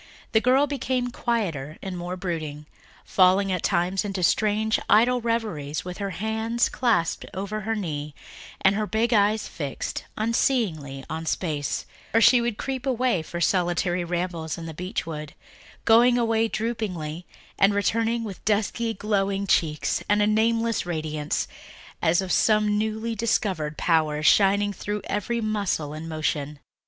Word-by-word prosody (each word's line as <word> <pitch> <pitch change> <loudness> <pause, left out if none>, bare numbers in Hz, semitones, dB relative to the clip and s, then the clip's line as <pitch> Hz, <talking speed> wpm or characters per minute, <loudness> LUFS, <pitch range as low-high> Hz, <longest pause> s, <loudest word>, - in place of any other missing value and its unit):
The 220 - +4
girl 260 +4 +4
became 260 -3 -2
quieter 170 - -2
and 190 -1 -4
more 175 +1 -4
brooding, 155 -5 -4 0.4
falling 190 +1 +4
at 180 -2 -1
times 180 +3 +1
into 195 -3 -3
strange, 215 +4 +2
idle 240 +4 +5
reveries, 210 -12 -2
with 180 +1 -6
her 200 -1 -2
hands 220 +4 0
clasped 225 -10 0
over 200 +3 -3
her 225 +2 -1
knee 150 -7 -4 0.5
and 190 - +5
her 210 +1 -1
big 230 +3 +1
eyes 210 0 +3
fixed 145 -5 -5
unseeingly 200 - 0
on 160 0 -5
space; 150 -5 -2 0.3
or - - +7
she 240 +2 +6
would 235 -3 -2
creep 265 -1 -4
away 250 -7 +1
for 170 +2 -6
solitary 175 0 +1
rambles 170 -2 -3
in 165 - -7
the 165 - -6
beech 180 +7 -4
wood, 150 -2 -6 0.5
going 240 +2 +6
away 225 -1 +2
droopingly 185 -8 -3 0.3
and 200 +1 +4
returning 230 +3 +1
with 200 -4 -7
dusky 220 +2 0
glowing 200 -1 0
cheeks 155 -5 +1
and 205 +1 +4
a 205 - +4
nameless 225 +1 +2
radiance, 155 -3 -2 0.5
as 170 +4 +3
of 185 - -4
some 210 -1 +3
newly 220 +2 -1
discovered 195 -9 -1
power, 155 -3 +1
shining 200 +4 +4
through 205 +2 -4
every 230 +3 -2
muscle 200 -9 -1
and 160 +2 -7
motion. 150 -2 -2
200 Hz, 145 wpm, -25 LUFS, 165-225 Hz, 0.5 s, or